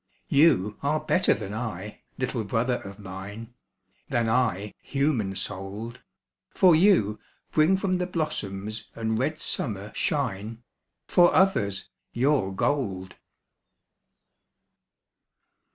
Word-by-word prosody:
You 105 - +4
are 150 +2 +1
better 180 +4 +2
than 100 - -6
I, 105 -3 -5 0.2
little 125 -3 -2
brother 115 +4 0
of 100 0 -9
mine, 100 +4 -8 0.6
Than 115 -1 +1
I, 105 -4 +1
human 135 -9 0
souled, 105 +5 -5 0.5
For 180 -3 +5
you 155 - +4 0.3
bring 160 +5 +4
from 185 -2 0
the 180 - -1
blossoms 110 - -4
and 110 -1 -1
red 155 +5 0
summer 105 -9 -3
shine, 115 -5 -2 0.4
For 175 -1 +5
others, 100 - +2 0.3
your 125 -5 +2
gold. 95 -6 -1
115 Hz, 105 wpm, -26 LUFS, 100-150 Hz, 0.6 s, For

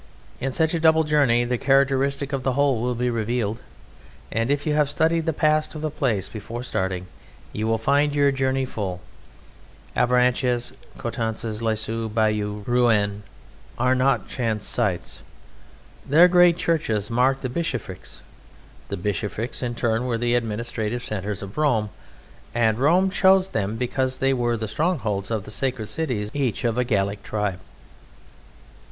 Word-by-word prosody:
In 135 +1 -2
such 160 +4 +1
a 165 - 0
double 160 0 +5
journey 140 -6 +3
the 120 0 -1
character 135 0 +3
of 140 0 -2
the 130 0 0
whole 135 -3 +2
will 125 0 -1
be 125 +1 0
revealed, 115 -1 -2 0.7
and 115 +2 0
if 145 0 0
you 155 - +1
have 150 -1 +2
studied 165 +2 +1
the - - +3
past 155 0 +1
of 155 - -5
the 155 - -1
place 110 - -1
before 115 +3 -7
starting 95 -6 -2 0.5
you 110 +1 -2
will 115 0 +2
find 145 +5 +2
your 140 -1 +4
journey 135 0 0
full. 95 -7 -4 1.0
Avranches, 125 0 +2 0.2
Coutances, 110 -1 -3
Lisieux, 110 0 -1
Bayeux, 105 -1 0
Rouen 110 -5 +2 0.6
are 130 0 +3
not 130 -3 +1
chance 110 -4 -2
sites. 100 -8 -2 0.8
Their 165 +5 +6
great 175 -1 +5
churches 115 - 0
mark 130 +3 +2
the 130 - -2
bishoprics; 125 - -5 0.7
the - - -3
bishoprics 105 +4 -3
in 120 -2 -3
turn 115 +1 0
were 120 -2 0
the 120 +1 0
administrative 115 0 -2
centres 105 -1 -4
of 100 +7 -7
Rome, 115 -9 +1 0.6
and 110 -1 +2
Rome 180 +7 +3
chose 190 0 +4
them 105 0 -1
because 130 +2 -1
they 135 +1 +2
were 120 -2 0
the 110 0 -3
strongholds 110 - -1
or 110 -2 -1
the 105 - -9
sacred 125 -2 -2
cities 125 -10 -2
each 130 -7 -1
of 120 0 0
a - - +3
Gallic 100 -4 -1
tribe. 105 -3 -2
120 Hz, 155 wpm, -23 LUFS, 110-140 Hz, 1.0 s, Their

